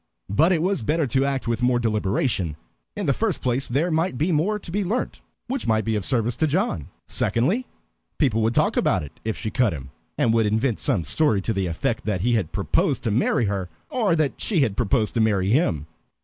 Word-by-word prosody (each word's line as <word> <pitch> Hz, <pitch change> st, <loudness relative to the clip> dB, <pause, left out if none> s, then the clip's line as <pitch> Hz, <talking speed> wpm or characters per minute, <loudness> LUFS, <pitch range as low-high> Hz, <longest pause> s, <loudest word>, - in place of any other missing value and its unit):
But 160 Hz, -, +4 dB
it 165 Hz, -3 st, +2 dB
was 195 Hz, -5 st, 0 dB
better 155 Hz, +7 st, +1 dB
to 135 Hz, +2 st, +1 dB
act 135 Hz, -3 st, -2 dB
with 115 Hz, 0 st, -1 dB
more 125 Hz, 0 st, +3 dB
deliberation. 105 Hz, -, 0 dB, 0.4 s
In 205 Hz, -, -3 dB
the 140 Hz, -, +3 dB
first 215 Hz, -, 0 dB
place, 125 Hz, +2 st, -1 dB
there 150 Hz, +8 st, 0 dB
might 160 Hz, -3 st, 0 dB
be 160 Hz, +7 st, +1 dB
more 175 Hz, +7 st, +1 dB
to 190 Hz, -, -10 dB
be 205 Hz, +3 st, 0 dB
learnt 220 Hz, +7 st, -2 dB, 0.3 s
which 260 Hz, +1 st, -3 dB
might 110 Hz, -1 st, +2 dB
be 110 Hz, -1 st, 0 dB
of 105 Hz, -, -1 dB
service 115 Hz, +2 st, +1 dB
to 160 Hz, -, +2 dB
John; 150 Hz, -, -1 dB, 0.2 s
secondly, 185 Hz, -, 0 dB, 0.5 s
people 120 Hz, -7 st, +2 dB
would 115 Hz, +2 st, +1 dB
talk -, -, +2 dB
about -, -, +2 dB
it 70 Hz, -, -12 dB
if 110 Hz, 0 st, -2 dB
she 110 Hz, -, -4 dB
cut 115 Hz, -4 st, +2 dB
him, 70 Hz, -3 st, -8 dB, 0.3 s
and 115 Hz, -, +2 dB
would 115 Hz, -2 st, +3 dB
invent 110 Hz, +2 st, 0 dB
some 115 Hz, -, +1 dB
story 145 Hz, -, +2 dB
to 115 Hz, -, -1 dB
the 95 Hz, -2 st, -1 dB
effect 110 Hz, +8 st, -2 dB
that 100 Hz, -4 st, -1 dB
he 120 Hz, +4 st, +2 dB
had 100 Hz, -9 st, 0 dB
proposed -, -, 0 dB
to 115 Hz, -, 0 dB
marry 115 Hz, +1 st, +2 dB
her, 100 Hz, -3 st, -2 dB, 0.2 s
or 215 Hz, -9 st, +2 dB
that 155 Hz, -4 st, -1 dB
she 185 Hz, -8 st, +1 dB
had 110 Hz, -7 st, +1 dB
proposed 115 Hz, -1 st, +1 dB
to 115 Hz, -, +1 dB
marry 100 Hz, -3 st, +2 dB
him. 90 Hz, -, +1 dB
120 Hz, 220 wpm, -23 LUFS, 105-155 Hz, 0.5 s, But